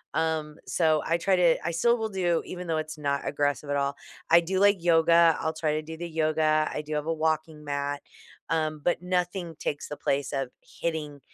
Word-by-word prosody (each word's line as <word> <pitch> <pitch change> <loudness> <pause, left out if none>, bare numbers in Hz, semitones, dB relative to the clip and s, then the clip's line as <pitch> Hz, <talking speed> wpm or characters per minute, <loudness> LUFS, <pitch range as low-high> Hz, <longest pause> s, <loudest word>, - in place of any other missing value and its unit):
Um, 160 -1 -1
so 155 -3 +2
I 165 +1 +2
try 190 +2 +2
to 170 -2 +4
I 170 - 0
still 235 +9 +3
will 220 -1 -2
do 175 -4 0
even 180 -1 -7
though 160 - 0
it's 155 0 -5
not 140 -1 -1
aggressive 145 -1 -1
at - - +1
all, 140 0 0 0.3
I 170 +1 +7
do 185 +3 -1
like 200 -3 +4
yoga, 165 -1 +5
I'll 160 0 -1
try 155 -1 -1
to 155 - -1
do 160 +1 -8
the 175 0 -5
yoga, 155 -1 +1
I 150 - -4
do 155 +1 -6
have 150 +1 -2
a 165 - +1
walking 155 -1 -1
mat, 145 0 -2 0.5
um, 155 -2 0
but 175 - +1
nothing 180 -2 -2
takes 145 - -3
the 150 - -6
place 140 0 -1
of 135 -2 -1
hitting 150 -4 -4
160 Hz, 210 wpm, -27 LUFS, 150-170 Hz, 0.5 s, I